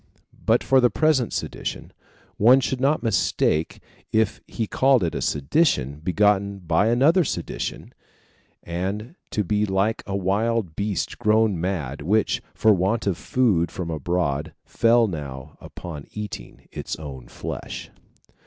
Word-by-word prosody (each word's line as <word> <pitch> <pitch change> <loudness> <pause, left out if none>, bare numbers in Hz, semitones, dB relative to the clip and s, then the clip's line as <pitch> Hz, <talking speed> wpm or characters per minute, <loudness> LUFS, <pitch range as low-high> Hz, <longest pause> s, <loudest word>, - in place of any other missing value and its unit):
But 115 +2 +4
for 135 -1 +4
the 125 - +5
present 150 -6 +2
sedition, - - -5 0.4
one 125 +5 +6
should 130 -1 -2
not 140 -1 +2
mistake 85 -7 +1 0.3
if 110 -1 +1
he 115 - -3
called 130 0 +3
it 85 - -1
a - - -3
sedition 75 - +1
begotten 100 +3 +2
by 85 +2 +1
another 140 +10 +4
sedition, - - -4 0.7
and 95 - -4 0.2
to 105 - -1
be 105 +3 0
like 100 +3 0
a 100 - -2
wild 100 -1 0
beast 100 -1 -2
grown 110 -4 +2
mad, 80 -7 -3
which, 105 +8 +1
for 110 -1 +5
want 100 +5 0
of 100 -3 +1
food 95 -5 +1
from 85 -3 -5
abroad, 80 -1 -1
fell 115 0 +3
now 70 - -6
upon 75 -5 -8
eating 105 0 -8
its - - -5
own 65 -5 -9
flesh. - - -7
100 Hz, 135 wpm, -24 LUFS, 85-115 Hz, 0.7 s, one